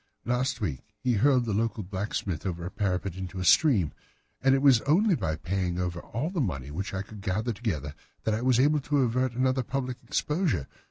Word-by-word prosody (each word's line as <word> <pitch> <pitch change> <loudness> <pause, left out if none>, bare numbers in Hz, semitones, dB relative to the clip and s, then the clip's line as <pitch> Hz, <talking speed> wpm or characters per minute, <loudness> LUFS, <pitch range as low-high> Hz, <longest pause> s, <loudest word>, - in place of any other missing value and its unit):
"Last 125 +1 0
week 75 -11 -2 0.2
he 125 +3 0
hurled 125 +3 +3
the 110 - -1
local 110 0 0
blacksmith 95 -2 -3
over 85 -3 -3
a 90 - -5
parapet 95 -2 -1
into 95 0 -6
a 90 - -2
stream, 105 - +5 0.5
and 135 +1 +5
it 135 - +1
was 130 -5 +6
only 190 +7 +4
by 80 - -1
paying 90 +3 -2
over 90 -1 -2
all 140 - -3
the 180 -5 -1
money 70 - -3
which 95 +6 -4
I 95 0 -3
could 105 -1 -11
gather 105 +4 -1
together 80 - -3 0.3
that 110 - +1
I 110 - -1
was 125 -1 +3
able 150 +3 +4
to 145 0 +1
avert 125 +1 +1
another 130 +1 +1
public 130 0 -3
exposure. 140 - 0
110 Hz, 205 wpm, -28 LUFS, 90-130 Hz, 0.5 s, was